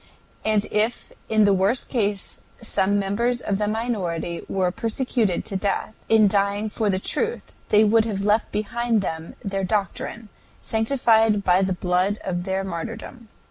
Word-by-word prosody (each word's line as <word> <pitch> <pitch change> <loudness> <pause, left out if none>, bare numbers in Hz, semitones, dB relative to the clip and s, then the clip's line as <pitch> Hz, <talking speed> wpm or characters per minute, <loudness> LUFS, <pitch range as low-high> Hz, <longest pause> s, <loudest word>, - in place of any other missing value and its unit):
And 215 -1 +2
if 215 +3 0 0.2
in 215 -1 +4
the 200 -1 +5
worst 195 +6 +1
case 205 -5 -1 0.2
some 205 -3 +1
members 230 +5 0
of 200 -4 -2
the 210 - +1
minority 195 -7 -2
were 185 -2 +1
persecuted 225 -2 -1
to 200 - -5
death, 200 +2 -1 0.2
in 220 -2 +6
dying 200 +1 +1
for 215 -1 0
the 190 - +1
truth 460 - -2 0.2
they 210 +1 +6
would 220 +1 +4
have 205 -4 -2
left 210 +2 +2
behind 225 +2 0
them 160 -2 -5
their 195 -1 -2
doctrine, 210 +2 -2 0.3
sanctified 225 -3 +2
by 180 0 +4
the 190 -1 +1
blood 180 +3 0
of 175 -1 -3
their 190 0 -1
martyrdom. 225 +6 -6
205 Hz, 155 wpm, -23 LUFS, 195-225 Hz, 0.3 s, in